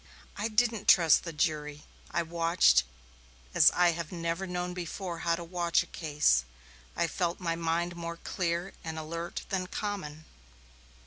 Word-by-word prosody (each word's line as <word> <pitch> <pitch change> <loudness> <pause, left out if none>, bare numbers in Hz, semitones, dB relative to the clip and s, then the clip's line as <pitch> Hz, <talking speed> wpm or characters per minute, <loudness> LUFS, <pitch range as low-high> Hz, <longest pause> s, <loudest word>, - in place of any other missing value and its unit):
"I 210 - -1
didn't 225 -1 +1
trust 170 -8 +6
the 165 - -4
jury. 150 -1 -2 0.3
I 170 +2 0
watched 165 - +3 0.7
as - - +7
I 175 -1 +3
have 165 -2 -5
never 170 +2 -3 0.3
before 180 0 -5
known - - -8
how 170 -1 +2
to 170 - -7
watch 170 0 +1
a - - -14
case. 145 - +1 0.5
I - - +1
felt 170 +1 -2
my 165 -2 -1
mind 170 +1 -1
more 170 0 -5
clear 175 +1 -2
and 160 -1 -5
alert 165 +2 -5
than 185 -2 -1
common." 180 -8 -5
170 Hz, 150 wpm, -30 LUFS, 165-180 Hz, 0.7 s, as